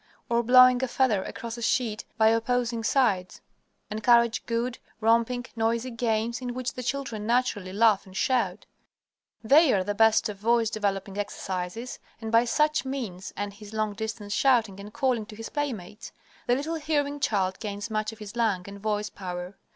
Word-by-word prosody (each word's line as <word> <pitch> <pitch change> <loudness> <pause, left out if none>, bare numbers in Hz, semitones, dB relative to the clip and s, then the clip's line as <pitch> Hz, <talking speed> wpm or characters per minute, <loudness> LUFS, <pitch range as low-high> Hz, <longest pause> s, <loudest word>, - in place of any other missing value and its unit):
Or 235 0 +3
blowing 255 +1 +6
a - - +1
feather 240 -6 +2
across 235 -1 -6
a - - -8
sheet 225 -2 0
by 220 -1 +5
opposing 230 0 0
sides. 220 -7 +1 0.5
Encourage 235 +2 +3
good, 235 +2 -2 0.2
romping, 230 +2 +2
noisy 230 +2 0
games 230 0 -1
in 245 -1 -4
which 255 -1 -3
the 255 - -6
children 245 -5 -3
naturally 230 -6 0
laugh 210 -1 +3
and 190 0 -9
shout. 220 -7 0 0.8
They 285 +5 +6
are 190 -2 +2
the 205 - -2
best 220 +1 +4
of 210 -2 -6
voice 230 +1 +2
developing 200 -1 -2
exercises, 195 +3 -4 0.2
and 225 -1 -5
by 230 +1 +5
such 300 +5 +2
means, 235 -9 -5
and 205 0 -3
his 210 +1 -12
long 215 -1 0
distance 215 0 -5
shouting 225 -7 +2
and 205 +1 -9
calling 240 -3 0
to 215 - -10
his 225 +1 -7
playmates, 225 -9 -5 0.4
the 245 - +4
little 295 +5 -3
hearing 290 -2 -1
child 190 -7 0
gains 205 +1 -5
much 215 0 -1
of 225 - -12
his 210 0 -9
lung 220 -6 +1
and 200 -1 -9
voice 210 0 -2
power. 180 0 -6
225 Hz, 175 wpm, -27 LUFS, 205-245 Hz, 0.8 s, blowing